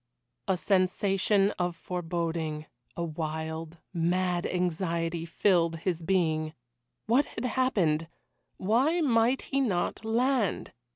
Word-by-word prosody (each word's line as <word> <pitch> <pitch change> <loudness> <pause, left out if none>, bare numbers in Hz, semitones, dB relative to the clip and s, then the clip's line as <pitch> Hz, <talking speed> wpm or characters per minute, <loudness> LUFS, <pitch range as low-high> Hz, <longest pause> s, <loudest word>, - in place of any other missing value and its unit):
A 190 -2 +2
sensation 195 +2 +2
of 175 -1 0
foreboding 165 -3 -3 0.3
a 170 - -1
wild, 160 0 -4 0.2
mad 175 +1 +1
anxiety, 170 -2 -1
filled 170 -2 +2
his 170 +1 -2
being. 160 -3 0 0.5
What 250 +6 +3
had - - -6
happened? 195 -12 +1 0.5
Why 260 - +2
might 245 -2 +3
he 275 - -1
not 200 -4 -1
land? 235 -1 0
180 Hz, 105 wpm, -29 LUFS, 165-210 Hz, 0.5 s, What